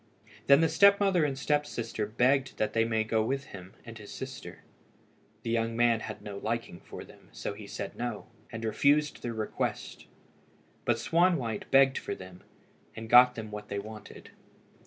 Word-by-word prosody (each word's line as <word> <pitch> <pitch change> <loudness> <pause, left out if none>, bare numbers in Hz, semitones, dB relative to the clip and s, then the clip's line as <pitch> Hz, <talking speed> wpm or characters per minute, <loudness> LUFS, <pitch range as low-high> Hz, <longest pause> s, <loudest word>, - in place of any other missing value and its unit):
Then 140 +2 +7
the 165 - +4
step 200 +5 +5
mother 195 -5 +3
and 135 -2 -2
step 145 +1 +1
sister 115 -6 -4
begged 130 +5 +1
that 105 0 -1
they 115 0 +2
might 110 -1 0
go 110 0 +1
with 135 +4 -2
him 95 -1 -11
and 115 -2 -10
his 105 - -11
sister. - - -8 0.8
The 115 - -3
young 115 0 -1
man 120 -1 +3
had - - -8
no 100 -1 -7
liking 115 -5 -4
for - - -10
them, - - -18
so - - -5
he 100 0 -10
said - - -6
no, 120 -3 -4 0.3
and 115 0 -5
refused 145 +7 +2
their 120 -2 -4
request, 110 -1 -4 0.8
but - - +2
Swanwhite 165 - +1
begged 135 0 +5
for - - -5
them, 90 -1 -12 0.5
and 110 0 -8
got 125 +1 +8
them 110 -2 -7
what 105 0 -7
they 100 - -3
wanted. 105 +1 -9
115 Hz, 180 wpm, -29 LUFS, 110-135 Hz, 0.8 s, got